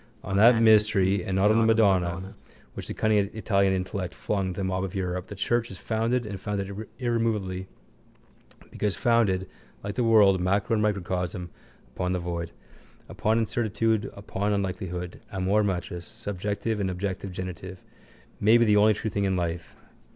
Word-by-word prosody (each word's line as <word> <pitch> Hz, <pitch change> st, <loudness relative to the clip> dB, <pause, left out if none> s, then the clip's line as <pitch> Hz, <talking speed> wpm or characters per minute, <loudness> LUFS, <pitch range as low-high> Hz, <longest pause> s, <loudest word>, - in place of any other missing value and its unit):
On 100 Hz, -, -3 dB
that 115 Hz, +3 st, +7 dB
mystery 105 Hz, -3 st, +4 dB
and 95 Hz, -, -2 dB
not 100 Hz, +2 st, +4 dB
on 110 Hz, -, +4 dB
the -, -, +4 dB
madonna 95 Hz, -4 st, +2 dB, 0.4 s
which -, -, -7 dB
the -, -, -4 dB
cunning 105 Hz, -2 st, +2 dB
Italian 100 Hz, -3 st, +1 dB
intellect 95 Hz, 0 st, -3 dB
flung 95 Hz, -3 st, -2 dB
to 90 Hz, -, -7 dB
the -, -, -1 dB
mob 95 Hz, 0 st, -1 dB
of 95 Hz, -1 st, -5 dB
Europe 90 Hz, -1 st, -3 dB
the 100 Hz, -, -8 dB
church 120 Hz, +4 st, 0 dB
is 95 Hz, -, -8 dB
founded 115 Hz, +3 st, -1 dB
and 100 Hz, -3 st, -6 dB
founded 100 Hz, +1 st, -4 dB
irremovably 110 Hz, -7 st, -1 dB, 1.0 s
because 105 Hz, -3 st, -1 dB
founded, 105 Hz, -6 st, +2 dB, 0.4 s
like 100 Hz, 0 st, -4 dB
the 125 Hz, -, 0 dB
world, 105 Hz, -5 st, +5 dB
macro 100 Hz, +5 st, +1 dB
and 110 Hz, -, +2 dB
microcosm, 90 Hz, -3 st, -2 dB, 0.4 s
upon 90 Hz, 0 st, -1 dB
the 90 Hz, -, -1 dB
void. 85 Hz, -1 st, -4 dB, 0.6 s
Upon 110 Hz, +1 st, 0 dB
incertitude, 110 Hz, -1 st, 0 dB
upon 100 Hz, 0 st, -2 dB
unlikelihood. 90 Hz, -3 st, -3 dB
Amor 95 Hz, +2 st, +1 dB
matris, 90 Hz, -2 st, -3 dB
subjective 105 Hz, 0 st, -3 dB
and 95 Hz, -2 st, 0 dB
objective 95 Hz, +1 st, -4 dB
genitive, 90 Hz, 0 st, -7 dB, 0.6 s
may 110 Hz, +3 st, +5 dB
be 120 Hz, -, +4 dB
the 105 Hz, -1 st, +4 dB
only 105 Hz, +1 st, +5 dB
true 110 Hz, +1 st, -3 dB
thing 100 Hz, +1 st, 0 dB
in 95 Hz, -1 st, +1 dB
life. 85 Hz, -1 st, -3 dB
100 Hz, 165 wpm, -26 LUFS, 95-110 Hz, 1.0 s, that